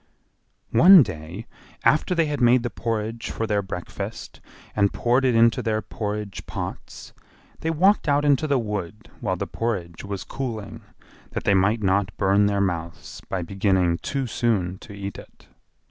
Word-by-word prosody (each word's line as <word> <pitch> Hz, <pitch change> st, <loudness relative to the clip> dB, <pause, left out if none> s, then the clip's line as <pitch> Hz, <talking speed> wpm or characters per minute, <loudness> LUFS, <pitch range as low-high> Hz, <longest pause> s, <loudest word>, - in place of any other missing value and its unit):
One 175 Hz, +7 st, +9 dB
day, 90 Hz, +2 st, -7 dB, 0.4 s
after 155 Hz, +4 st, +3 dB
they 165 Hz, -1 st, +3 dB
had 145 Hz, -3 st, -3 dB
made 120 Hz, 0 st, +5 dB
the 120 Hz, -, -3 dB
porridge 115 Hz, 0 st, -3 dB
for 115 Hz, -, -2 dB
their 105 Hz, -2 st, +1 dB
breakfast 95 Hz, -2 st, -7 dB, 0.3 s
and 100 Hz, -1 st, +3 dB
poured 125 Hz, +3 st, +1 dB
it 125 Hz, -3 st, +3 dB
into 115 Hz, 0 st, +4 dB
their 110 Hz, -1 st, -1 dB
porridge 105 Hz, -2 st, -5 dB
pots, -, -, -7 dB, 0.5 s
they 160 Hz, -, -2 dB
walked 180 Hz, +2 st, +3 dB
out 145 Hz, +1 st, +2 dB
into 145 Hz, +2 st, +3 dB
the 140 Hz, -2 st, +2 dB
wood 105 Hz, -3 st, -5 dB
while -, -, -1 dB
the -, -, -3 dB
porridge 95 Hz, -8 st, -4 dB
was 100 Hz, -1 st, -5 dB
cooling, 115 Hz, -4 st, -6 dB, 0.5 s
that -, -, -3 dB
they 100 Hz, -, +3 dB
might 105 Hz, +4 st, +2 dB
not 95 Hz, +1 st, +1 dB
burn 100 Hz, +1 st, +3 dB
their 100 Hz, -1 st, 0 dB
mouths 85 Hz, -3 st, -4 dB
by 95 Hz, -2 st, -2 dB
beginning 95 Hz, -2 st, +1 dB
too 140 Hz, -2 st, -2 dB
soon 100 Hz, -7 st, -1 dB
to -, -, -12 dB
eat 100 Hz, -1 st, -6 dB
it. -, -, -16 dB
105 Hz, 160 wpm, -24 LUFS, 95-120 Hz, 0.5 s, One